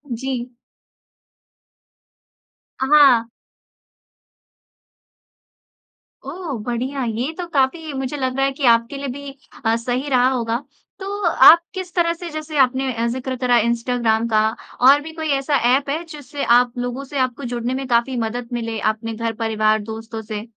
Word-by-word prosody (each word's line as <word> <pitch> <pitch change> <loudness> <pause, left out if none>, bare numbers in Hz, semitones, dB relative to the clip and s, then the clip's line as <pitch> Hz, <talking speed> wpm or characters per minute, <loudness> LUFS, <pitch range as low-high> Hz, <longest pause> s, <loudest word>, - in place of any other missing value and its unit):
जी। 250 0 -4 2.3
अ, - - +1
हाँ। 270 -6 +7 3.0
ओह, 335 +4 -6
बढ़िया! 255 +4 -3
ये 240 +6 -2
तो 355 - -4
काफ़ी 295 +3 0
मुझे 265 +1 -3
लग 260 -2 -2
रहा 270 - +2
है 275 - -1
कि 275 +1 -6
आपके 230 +4 0
लिए 275 0 -5
भी 280 0 -8 0.3
अ, 225 0 +3
सही 245 +4 -3
रहा 255 -2 +3
होगा। 230 -3 -1 0.4
तो 405 +1 -5
आप 335 0 +8
किस 370 -2 -6
तरह 340 -1 +2
से 345 +1 -8
जैसे 310 0 -6
आपने 260 0 +2
अ, 230 0 -1
ज़िक्र 255 +2 -3
करा 245 -1 +3
इंस्टाग्राम 235 -1 0
का 215 -1 +3 0.3
और 275 +3 +7
भी 320 +2 -9
कोई 315 -1 -4
ऐसा 280 +1 0 0.2
ऐप 280 +1 0
है 310 +4 -2
जिससे 295 -3 -6
आप 245 -1 +1
लोगों 245 +2 -3
से 275 0 -5
आपको 255 +1 -1
जुड़ने 240 +2 -2
में 265 0 -4
काफ़ी 240 +2 +1
मदद 235 +1 -5
मिले 230 -2 -3 0.2
अपने 225 +1 -6
घर-परिवार, 220 -1 0
दोस्तों 225 +1 -7
से? 215 0 -6
255 Hz, 150 wpm, -20 LUFS, 230-285 Hz, 3.0 s, आप